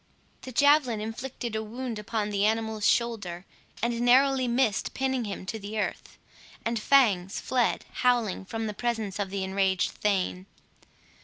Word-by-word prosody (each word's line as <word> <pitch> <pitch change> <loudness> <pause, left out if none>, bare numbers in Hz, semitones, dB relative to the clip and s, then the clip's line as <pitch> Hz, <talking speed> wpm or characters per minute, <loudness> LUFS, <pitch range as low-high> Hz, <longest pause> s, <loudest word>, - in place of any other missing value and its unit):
The 260 - -8
javelin 285 -3 +4
inflicted 235 +1 -5
a 220 - -1
wound 230 +1 -5
upon 210 0 -2
the 200 -1 0
animal's 220 0 +1
shoulder, 205 -7 0 0.4
and 235 0 0
narrowly 260 +1 +4
missed 235 -3 +1
pinning 265 -2 0
him 200 -2 -5
to 220 +3 -4
the 205 +2 -6
earth; - - -4 0.5
and 230 0 0
Fangs 215 -7 +3
fled 250 -3 0 0.2
howling 240 -6 +2
from 225 +3 -4
the 210 - -3
presence 220 -4 -2
of 200 -1 -1
the 195 0 -3
enraged 190 -1 +1
thane. 190 -2 -1
220 Hz, 150 wpm, -27 LUFS, 205-245 Hz, 0.5 s, javelin